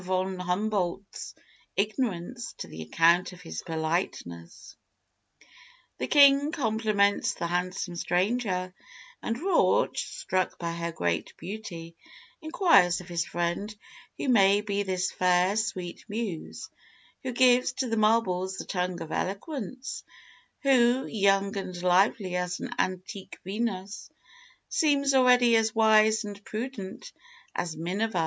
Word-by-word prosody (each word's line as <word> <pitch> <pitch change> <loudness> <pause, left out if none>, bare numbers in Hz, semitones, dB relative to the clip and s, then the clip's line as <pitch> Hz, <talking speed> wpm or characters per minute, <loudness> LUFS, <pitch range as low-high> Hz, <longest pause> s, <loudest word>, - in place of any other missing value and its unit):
von 185 0 -2
Humboldt's 195 0 -2 0.4
ignorance 215 +1 -2
to - - -6
the 80 - -9
account 170 - +3
of 180 - -13
his 80 0 -6
politeness. 160 - -4 1.2
"The 125 - -2
king 280 - +6
compliments 215 -6 +1
the - - -3
handsome 180 +1 -2
stranger, 185 +1 0 0.5
and 230 - -2
Rauch, 380 +4 +2
struck 185 -1 -2
by 170 -1 -3
her 170 0 -3
great 85 - -2
beauty, 170 -3 -7 0.5
inquires 315 - +4
of 180 0 -11
his 170 -1 -1
friend 175 +5 -2 0.4
who - - -3
may 200 -4 +5
be 205 -1 -1
this 185 -1 -1
fair, 180 +2 +2
sweet 185 -5 -3
Muse, 205 -6 -5 0.5
who 260 - -3
gives 250 0 +4
to 260 0 -2
the 225 - -1
marbles 190 -4 +1
the - - -6
tongue 180 -1 -2
of 160 - -10
eloquence, 255 - -4 0.6
who, 260 -1 +4
young 200 -1 +2
and 185 -2 -5
lovely 185 +1 +2
as 180 0 -2
an - - -5
antique 185 +2 -3
Venus, 200 0 -4 0.6
seems 280 -3 +2
already 250 -2 +5
as 220 0 +2
wise 220 0 +4
and 205 -1 -8
prudent 220 - -6 0.4
as 165 -3 -3
Minerva. 185 +4 -1
195 Hz, 125 wpm, -27 LUFS, 180-225 Hz, 1.2 s, king